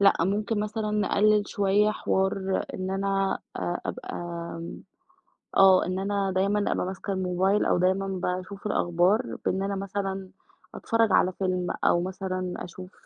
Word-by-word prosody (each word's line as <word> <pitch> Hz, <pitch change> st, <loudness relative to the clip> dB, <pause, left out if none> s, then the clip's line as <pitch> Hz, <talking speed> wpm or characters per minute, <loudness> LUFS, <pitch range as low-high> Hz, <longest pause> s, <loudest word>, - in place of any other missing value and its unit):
لأ، 200 Hz, 0 st, +7 dB
ممكن 205 Hz, +4 st, 0 dB
مثلًا 215 Hz, 0 st, -2 dB
نقلل 210 Hz, 0 st, +2 dB
شوية 205 Hz, +1 st, +2 dB
حوار 190 Hz, -2 st, 0 dB
إن 185 Hz, 0 st, -3 dB
أنا 195 Hz, 0 st, 0 dB, 0.2 s
آآ، 175 Hz, -, -2 dB
أبقى -, -, -5 dB
آمم، 170 Hz, -1 st, -6 dB, 0.7 s
آه 190 Hz, -1 st, +7 dB
إن 185 Hz, +1 st, -2 dB
أنا 195 Hz, 0 st, 0 dB
دايمًا 200 Hz, +2 st, +1 dB
أبقى -, -, 0 dB
ماسكة 190 Hz, +1 st, -4 dB
الموبايل 190 Hz, +2 st, +1 dB
أو -, -, +2 dB
دايمًا 190 Hz, +2 st, +2 dB
باشوف 185 Hz, +2 st, -4 dB
الأخبار، 185 Hz, +4 st, +1 dB
بإن 190 Hz, +1 st, 0 dB
أنا 200 Hz, 0 st, -2 dB
مثلًا، 195 Hz, -1 st, -3 dB, 0.5 s
أتفرّج 230 Hz, -3 st, +1 dB
على 185 Hz, -, +4 dB
فيلم 185 Hz, -1 st, -1 dB, 0.2 s
أو 175 Hz, -, +4 dB
مثلًا 185 Hz, 0 st, -3 dB
أشوف، 185 Hz, +2 st, -9 dB
195 Hz, 140 wpm, -27 LUFS, 185-200 Hz, 0.7 s, لأ